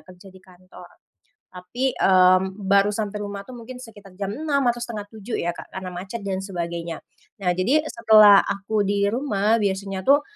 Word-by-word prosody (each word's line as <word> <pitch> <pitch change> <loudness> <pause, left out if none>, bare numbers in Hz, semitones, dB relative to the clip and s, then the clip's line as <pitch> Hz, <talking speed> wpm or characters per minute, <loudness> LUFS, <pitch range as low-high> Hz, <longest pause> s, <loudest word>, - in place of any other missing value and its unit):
kerja 185 +1 -15
di 190 - -15
kantor. 185 0 -16 0.6
Tapi, 235 +9 -3
mmm, 185 +1 +3
baru 200 +1 +3
sampai 210 -1 -3
rumah 200 -1 -6
tuh 255 - -10
mungkin 250 +2 -10
sekitar 205 -5 -14
jam 195 -1 -3
06:00 295 -2 -1
atau 240 - -1
06:30 215 0 -7
ya 175 - -1
Kak, - - -11
karena 190 -1 -6
macet 190 +5 -7
dan 190 -1 -3
sebagainya. 170 -3 -5 0.4
Nah, 180 -1 +1
jadi 260 +12 +2
setelah 215 -3 +7
aku 200 +1 -1
di 200 0 +1
rumah, 225 -4 +1
biasanya 195 -1 -2
tuh 285 +2 +5
200 Hz, 170 wpm, -23 LUFS, 185-225 Hz, 0.6 s, setelah